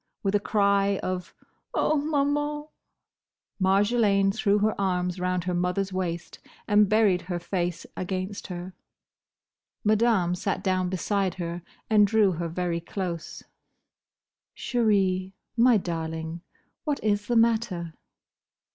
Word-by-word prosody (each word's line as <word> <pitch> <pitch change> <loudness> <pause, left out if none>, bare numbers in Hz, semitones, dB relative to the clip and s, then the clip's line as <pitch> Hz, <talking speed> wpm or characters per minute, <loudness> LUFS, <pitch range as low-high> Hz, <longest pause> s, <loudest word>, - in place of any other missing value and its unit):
With 195 -1 0
a 205 - +4
cry 200 -1 +2
of 185 -1 -4 0.4
"Oh, 310 - +2
Maman!" 295 0 0 1.0
Marjolaine 195 +1 +3
threw 205 -1 +2
her 210 +1 +2
arms 180 -1 0
round 180 -1 0
her 180 0 -2
mother's 180 +2 -1
waist 175 -2 -4 0.3
and 210 -1 +4
buried 210 -4 +3
her 175 - -1
face 175 -1 -3
against 185 +2 -4
her. 180 0 -6 1.1
Madame 215 -4 +3
sat 190 +2 -2
down 185 -1 +1
beside 190 0 -1
her 175 -1 -4 0.3
and 210 -2 +5
drew 210 -2 +4
her 170 0 -3
very 170 0 -2
close. 170 -1 -5 1.1
"Chérie—my 210 +1 +1
darling! 160 -2 -4 0.4
What 295 -3 -1
is 205 -1 +1
the 240 - 0
matter?" 220 -8 +1
195 Hz, 115 wpm, -26 LUFS, 180-215 Hz, 1.1 s, and